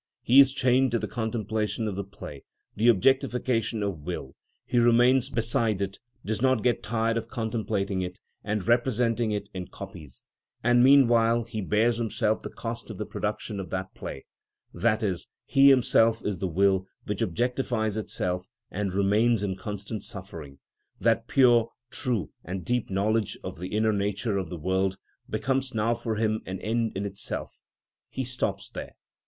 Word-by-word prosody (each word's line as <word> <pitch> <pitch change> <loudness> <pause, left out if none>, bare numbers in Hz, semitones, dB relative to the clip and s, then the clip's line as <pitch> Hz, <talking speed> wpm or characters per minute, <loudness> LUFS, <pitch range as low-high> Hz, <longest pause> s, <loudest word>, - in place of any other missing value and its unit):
He 130 +3 +6
is 135 -1 +8
chained 130 0 +3
to - - +4
the - - -3
contemplation 110 -1 -2
of 100 - -3
the 100 - -3
play, 75 -7 -10 0.3
the 110 +3 +2
objectification 120 -1 +2
of 100 -5 -2
will; 75 -4 -6 0.3
he 120 -1 +1
remains 120 +2 +4
beside 115 -3 +1
it, 100 0 -3 0.3
does 110 +1 -2
not 130 -4 +3
get 125 -2 +2
tired 115 +1 0
of 115 -1 -3
contemplating 110 -5 -2
it 90 0 -5 0.2
and 105 -3 -2
representing 120 -1 +2
it 105 -1 -2
in 90 -1 -5
copies; 90 -9 -10 0.4
and 120 +1 +5
meanwhile 120 -4 +5
he 110 -1 -5
bears 110 +4 +2
himself 110 -1 0
the - - -6
cost 115 0 -6
of - - -7
the - - -3
production 105 - -3
of 95 -3 -6
that 95 +1 -4
play, 65 - -7 0.5
i.e., 105 0 +1 0.3
he 140 0 +6
himself 115 -3 +4
is 100 -3 -2
the 95 - -1
will 95 +2 +2 0.2
which 105 +1 -3
objectifies 115 +1 0
itself, 90 -4 -2 0.2
and 100 -1 -2
remains 105 +3 +3
in 95 -2 -1
constant 105 +1 -6
suffering. 80 -8 -8 0.4
That - - +2
pure, 120 -3 +5 0.2
true, 115 - -2
and 90 0 -5
deep 125 -1 0
knowledge 105 +2 0
of - - -6
the 90 - -4
inner 110 +2 +1
nature 100 +1 -1
of 90 -4 -4
the 90 - -5
world 95 +3 0 0.3
becomes 135 -1 -1
now 110 +2 +2
for 115 -1 -3
him 110 0 0
an 95 0 -4
end 115 +1 0
in 100 - -2
itself: 100 0 -5 0.5
he 130 - -3
stops 125 0 -2
there. - - -7
110 Hz, 165 wpm, -27 LUFS, 95-120 Hz, 0.5 s, is